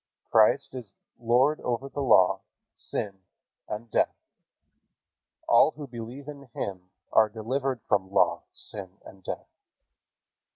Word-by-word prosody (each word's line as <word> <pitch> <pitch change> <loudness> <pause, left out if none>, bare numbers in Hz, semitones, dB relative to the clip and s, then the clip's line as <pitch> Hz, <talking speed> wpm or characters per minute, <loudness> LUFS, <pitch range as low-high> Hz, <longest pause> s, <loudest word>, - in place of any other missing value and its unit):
Christ 110 +2 +4
is 120 -6 -8 0.3
Lord 125 +6 +3
over 125 +2 -2
law, 130 -10 +4 0.3
sin 100 -2 -5 0.5
and 110 +2 -5
death. - - +2 1.3
All 120 +6 +6
who 150 - -7
believe 120 +3 -8
in 140 -3 -9
Him 90 -2 -4 0.2
are 110 -1 +6
delivered 125 +3 -2
from 95 -2 +2
law, 85 -3 +3
sin 95 -2 -8
and 95 -1 -13
death. - - -5
115 Hz, 115 wpm, -28 LUFS, 100-130 Hz, 1.3 s, All